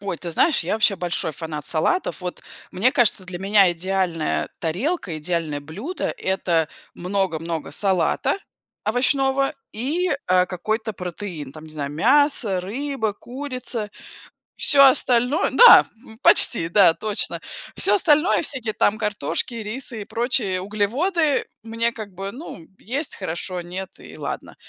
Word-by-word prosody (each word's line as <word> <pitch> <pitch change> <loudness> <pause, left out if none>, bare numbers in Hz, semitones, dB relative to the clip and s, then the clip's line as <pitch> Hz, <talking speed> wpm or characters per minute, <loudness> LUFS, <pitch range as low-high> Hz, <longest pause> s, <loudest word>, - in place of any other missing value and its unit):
Ой, 200 -4 -4
ты 170 - -6
знаешь, 305 - +2
я - - -2
вообще 215 -2 +3
большой 175 -2 -1
фанат 150 0 -6
салатов. 185 - -1
Вот, 180 -1 -6 0.3
мне 235 +8 +1
кажется, 215 -5 +2
для 180 -1 -7
меня 195 0 +4
идеальная 175 -2 -2
тарелка, 180 - -2
идеальное 160 -3 -3
блюдо- 210 - -5
это 170 -4 0 0.3
много-много 170 -4 -3
салата 190 - 0 0.5
овощного 270 +4 +1 0.2
и, 310 +11 -1 0.2
э, 185 0 +3
какой-то 220 +4 -3
протеин, 175 -6 -7
там, 155 0 -12
не 155 - -11
знаю: 145 -2 -4
мясо, 235 - +2
рыба, 225 +2 -3
курица. 250 -3 -4 0.7
Всё 275 -2 +6
остальное 255 +2 +3
Да, 485 -1 +9 0.4
почти, 165 -9 +6
да, 180 -2 +5
точно. 215 +2 -2 0.3
Всё - - +4
остальное, 330 -2 +3
всякие 245 -7 -2
там 215 - +1
картошки, 210 - -2
рисы 230 +1 -5
и 200 - -7
прочие 225 -6 0
углеводы, 275 - 0 0.2
мне, 230 +1 -1
как 215 -4 -9
бы, 195 +2 -6
ну: 240 - -10
есть- 270 +7 -4
хорошо, 180 0 -4
нет- 185 +2 -7
и - - -13
ладно. - - -6
205 Hz, 135 wpm, -22 LUFS, 175-255 Hz, 0.7 s, Да